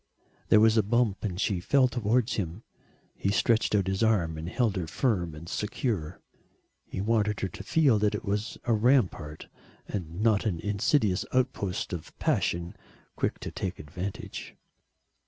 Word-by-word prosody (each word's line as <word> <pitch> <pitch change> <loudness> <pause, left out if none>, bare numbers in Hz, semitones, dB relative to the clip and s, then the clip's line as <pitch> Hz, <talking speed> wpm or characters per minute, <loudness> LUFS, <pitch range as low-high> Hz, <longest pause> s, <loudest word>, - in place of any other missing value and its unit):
There 110 - +7
was 110 +1 +5
a - - +6
bump 110 -1 +1
and 95 -4 -3
she 100 -3 +1
fell 130 +8 +4
towards 120 0 +1
him. 95 +2 -3 0.5
He 100 - -1
stretched 110 +1 +2
out 100 -2 +2
his 95 +2 -1
arm 100 -8 +2
and 80 +2 -5
held 115 -1 +1
her 90 -4 -2
firm 90 - 0
and 80 +2 -10
secure. 100 - -2 0.7
He - - -5
wanted 105 0 +1
her 95 - 0
to - - -9
feel 140 -9 +3
that 105 0 +2
it - - -5
was 105 +3 -2
a 120 - +1
rampart 105 - +1 0.4
and 85 -3 -5
not 110 -2 +3
an 85 -6 -1
insidious 105 - +1
outpost 125 -9 -1
of 85 -3 -7
passion 85 0 0 0.4
quick - - -1
to - - -5
take 95 -2 -4
advantage. 90 +6 -6
105 Hz, 160 wpm, -28 LUFS, 90-115 Hz, 0.7 s, There